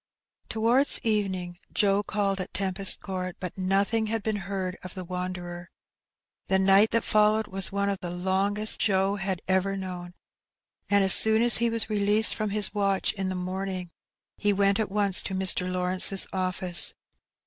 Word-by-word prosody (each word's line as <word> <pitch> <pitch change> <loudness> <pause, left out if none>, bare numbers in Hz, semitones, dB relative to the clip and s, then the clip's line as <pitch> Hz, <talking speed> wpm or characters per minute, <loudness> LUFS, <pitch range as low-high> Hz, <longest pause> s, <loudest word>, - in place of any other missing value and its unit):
Towards 235 +6 +2
evening 190 -6 -2
Joe 200 -1 +2
called 200 -1 -2
at 185 - -8
Tempest 195 0 +1
Court, 185 -2 -5
but 180 -2 -6
nothing 200 +4 0
had 225 -1 -3
been 215 -1 -1
heard 190 -2 -3
of 185 - -10
the 185 - -6
wanderer. 180 -1 -6 0.8
The 190 - +2
night 195 +3 +5
that 230 - 0
followed 215 0 +2
was 195 -2 -4
one 200 0 -1
of 200 -2 -2
the 175 - -6
longest 190 +4 -1
Joe 195 -1 +1
had 190 -2 -3
ever 190 +1 0
known, 180 -2 -7 0.7
and 200 -1 +3
as 190 - +5
Boon 220 +1 +2
as 240 -1 +6
he 235 0 +1
was 230 -1 0
released 210 +1 +2
from 215 -1 -3
his 205 0 -2
watch 200 -2 0
in 195 -2 -4
the 185 - -4
morning 185 -1 -5 0.5
he 205 - +1
went 200 +1 +2
at 220 - -1
once 200 -2 +2
to 190 - -5
Mr. 185 -1 0
Lawrence's 185 +1 +3
office. 185 -2 +1
195 Hz, 170 wpm, -26 LUFS, 185-210 Hz, 0.8 s, as